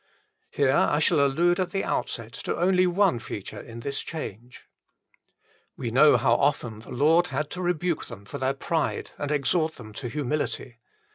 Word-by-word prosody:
Here 140 -2 +2
I 145 - +3
shall 155 +1 +3
allude 175 +6 +2
at 185 - 0
the 195 - -2
outset 115 0 -3
to - - -4
only 185 +1 +4
one 180 -6 +2
feature 100 -3 -7
in 115 0 -10
this 140 +3 -3
change. 125 - -7 1.1
We - - -3
know - - +6
how - - +3
often 110 -3 0
the 110 - -14
Lord 160 +7 +3
had 150 0 -3
to 180 - -5
rebuke 175 -2 -1
them 105 -4 -10
for 140 - -7
their 130 +1 0
pride 160 +3 -2
and 145 - -2
exhort 155 +2 +1
them 110 -3 -11
to 115 - -6
humility. 135 -2 -3
145 Hz, 170 wpm, -26 LUFS, 120-175 Hz, 1.1 s, know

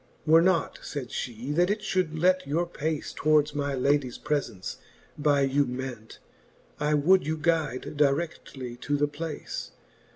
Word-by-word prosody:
Were 160 +1 +7
not, 180 -1 +1
fayd 135 -5 -6
flie, 120 +3 -4
that 175 +4 +3
it 210 +1 0
fliould 185 -6 -1
let 185 -2 +3
your 165 +5 +1
pace 160 -2 -3
Towards 150 -1 +3
my 145 -1 -1
ladies 135 -1 +1
prefence 115 -10 -3 0.4
by 145 -1 +2
you 135 +1 +2
ment, 125 -3 -6 0.6
I 150 0 +2
would 170 +3 +4
you 160 0 0
guyde 155 -5 0
dire6i:ly 140 -4 -1
to 145 0 0
the 145 +1 +2
place. 150 +1 -5
145 Hz, 150 wpm, -27 LUFS, 135-160 Hz, 0.6 s, Were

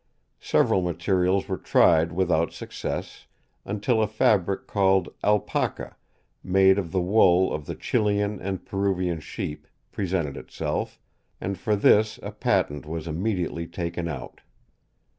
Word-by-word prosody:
Several 95 - +2
materials 90 +2 0
were - - -3
tried 80 0 +4
without 85 -2 +1
success, - - -6 0.4
until 105 +3 0
a 110 - +2
fabric 100 -2 +1
called 95 -3 +2
Alpaca, 105 -1 0 0.5
made 95 +1 +4
of 85 -5 -4
the 95 - +1
wool 95 -1 +4
of 75 -1 -5
the - - -4
Chilian 105 -1 0
and 95 -1 -4
Peruvian 95 -4 -1
sheep, 75 0 -6 0.2
presented 85 -7 -2
itself, - - -4 0.4
and 100 +1 -3
for 105 +4 0
this 105 +1 +3
a - - -5
patent 75 0 0
was 80 0 -5
immediately 85 0 -2
taken 85 0 -4
out. 70 -6 -7
95 Hz, 125 wpm, -25 LUFS, 85-100 Hz, 0.5 s, tried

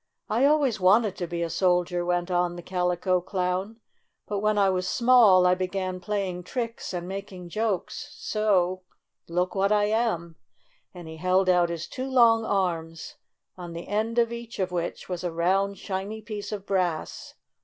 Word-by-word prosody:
"I 240 +5 +3
always 280 -7 +3
wanted 200 +2 +4
to 175 - -3
be 170 0 -3
a 170 - -2
soldier," 180 -1 +1
went 175 +1 -1
on 175 0 +1
the 175 - -8
Calico 180 0 0
Clown, 185 +4 -2 0.5
"but 205 -1 -3
when 215 +1 +1
I 200 -1 +4
was 185 -1 0
small 235 -7 +6
I 180 - +5
began 185 0 -3
playing 190 -2 -3
tricks 230 +5 -4
and 175 -1 -4
making 190 -2 -7
jokes, 220 - -3
so 185 -4 +1 0.2
— - - -57
look 180 +2 -1
what 195 +1 +1
I 210 -1 +4
am!" 205 -7 -1 0.5
and 175 -3 -10
he 160 0 -9
held 185 +2 +2
out 175 -1 +4
his 170 -1 -4
two 260 +1 -5
long 230 -3 +5
arms, 165 -6 -2 0.4
on 175 -2 -8
the 170 +1 -7
end 220 +3 -1
of 235 0 +2
each 235 -1 -8
of 185 -2 -1
which 175 -1 -4
was 180 -1 -4
a 175 - -2
round, 190 +4 +1
shiny 195 +3 -4
piece 210 -2 -6
of 200 -2 -5
brass. 180 -5 -2
185 Hz, 175 wpm, -26 LUFS, 180-215 Hz, 0.5 s, small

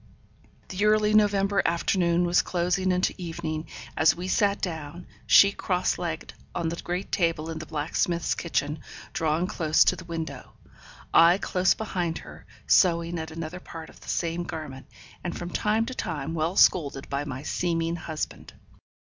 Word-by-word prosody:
The 190 +3 -1
early 215 0 +4
November 200 -2 +3
afternoon 170 0 +2
was 175 0 +4
closing 180 +1 0
into 180 +1 +1
evening, 165 -2 -4 0.3
as 160 0 +4
we 180 +2 -5
sat 200 +1 +2
down, 160 -1 -5 0.2
she 200 - +8
cross 185 -2 -1
legged 165 -2 -4 0.2
on 170 -2 -1
the 170 - -3
great 180 +3 -4
table 165 -2 0
in 160 - -5
the 155 - -8
blacksmith's 160 +2 0
kitchen, 150 -2 -2 0.3
drawn 160 +2 +1
close 160 -3 +3
to - - +3
the - - -9
window, 165 -1 -6 0.6
I 170 +2 +7
close 185 -2 +2
behind 180 -6 -2
her, - - -12 0.2
sewing 170 -2 +3
at 160 0 -5
another 165 +2 -6
part 165 -2 -10
of - - -18
the - - -11
same 170 0 -1
garment, 155 -6 -7 0.4
and 175 - -4
from 175 0 -6
time 215 +4 +1
to 260 - -5
time 160 - -4
well 165 +2 -1
scolded 140 -8 +3
by 140 +1 -2
my 140 -2 -6
seeming 165 0 -1
husband. 160 -2 -6
170 Hz, 160 wpm, -26 LUFS, 160-180 Hz, 0.6 s, she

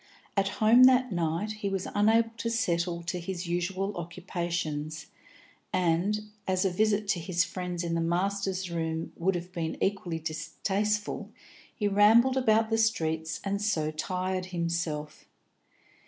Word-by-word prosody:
At 195 -1 +2
home 230 +4 +7
that 255 -1 +5
night 170 +4 -1
he 200 - -1
was 195 -1 -2
unable 225 +2 +3
to 230 +1 -2
settle 170 -6 0
to 170 +1 -3
his 180 +1 -4
usual 185 +3 -2
occupations, 170 -3 -4 0.7
and, 185 +4 +1 0.3
as 185 0 +1
a 190 - +2
visit 210 +2 +1
to 185 - +2
his 170 +1 +1
friends 180 -2 -4
in 170 -1 -2
the 165 - +1
Masters' 190 +1 -1
Room 160 -1 -3
would 185 +2 0
have 175 +1 -5
been 165 -3 -3
equally 190 -4 -1
distasteful, 190 +7 -2 0.5
he 210 - 0
rambled 220 +6 +5
about 225 -3 +3
the 225 - +2
streets 160 -8 0
and 200 0 -1
so 165 -8 0
tired 185 +3 -2
himself. 170 -4 -3
185 Hz, 140 wpm, -29 LUFS, 170-205 Hz, 0.7 s, home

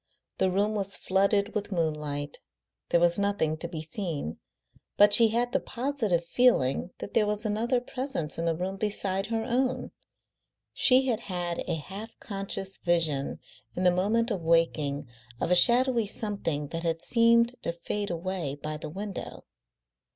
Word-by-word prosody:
The 190 - +3
room 200 +3 +1
was 200 -2 -1
flooded 200 +2 +1
with 205 0 -3
moonlight, 150 -4 -2 0.5
there 170 - +4
was 175 +2 +3
nothing 200 -6 0
to 170 - -5
be 160 -2 -6
seen, 160 - -4 0.6
but 205 0 +7
she 230 0 +9
had 240 +2 0
the - - +2
positive 235 -10 -1
feeling 175 - +2
that - - -8
there 215 -2 +3
was 210 +1 -2
another 230 +4 +1
presence 250 - -4
in 165 - -1
the 165 -1 +1
room 185 +3 -4
beside 195 -2 -1
her 225 -1 -1
own; 255 +1 0 0.8
she 260 +1 +4
had 235 -5 0
had 175 -5 -4
a - - 0
half 200 +8 -9
conscious 195 -1 -4
vision 165 -5 +1 0.4
in 180 - -2
the 180 - +5
moment 220 +6 +1
of 195 -4 -2
waking 155 -4 +1 0.3
of - - -1
a - - +6
shadowy 240 +3 +4
something 170 -9 -2
that 165 - -4
had 165 -1 -2
seemed 235 +1 +3
to - - -2
fade 200 +4 -4
away 170 -4 -3
by 155 +1 -5
the 150 - -7
window. 195 +4 -7
195 Hz, 160 wpm, -28 LUFS, 165-220 Hz, 0.8 s, she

